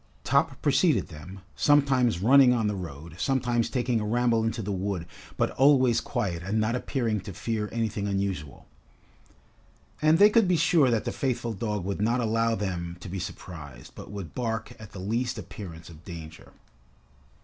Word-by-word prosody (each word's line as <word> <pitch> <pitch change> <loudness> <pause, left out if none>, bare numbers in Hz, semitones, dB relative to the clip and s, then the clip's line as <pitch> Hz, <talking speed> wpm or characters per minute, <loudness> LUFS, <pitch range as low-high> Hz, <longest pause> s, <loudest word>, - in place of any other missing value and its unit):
Top - - +1
preceded - - +3
them, 90 +6 -10
sometimes 130 - +3
running 130 +1 +7
on 115 -3 0
the 105 - 0
road, 80 -3 -8
sometimes 120 -1 +1
taking 125 -3 0
a - - -2
ramble 115 +1 +1
into 115 0 -2
the 100 - -3
wood, 95 -2 -2 0.3
but - - +1
always 130 -3 +4
quiet 85 -4 -2
and 100 +4 -1
not 110 +2 +1
appearing 120 -4 -1
to 100 - -8
fear 105 +3 -3
anything 110 -3 -2
unusual. 95 -8 -3 1.4
And 155 +1 +5
they 205 +3 +7
could 225 -3 +4
be 180 -1 +3
sure 155 -5 +4
that 115 -3 0
the - - -1
faithful 120 -3 -2
dog 105 -2 -3
would 100 +1 -3
not 115 +4 +2
allow 115 0 +1
them 85 -4 -4
to 90 - -9
be 95 +2 -4
surprised, 70 -8 -9
but - - -10
would 100 -6 -7
bark 110 -2 -3
at 110 -2 -11
the 95 - -8
least 115 +6 -2
appearance 85 -6 -9
of 80 -1 -13
danger. 80 -3 -10
110 Hz, 170 wpm, -27 LUFS, 95-120 Hz, 1.4 s, running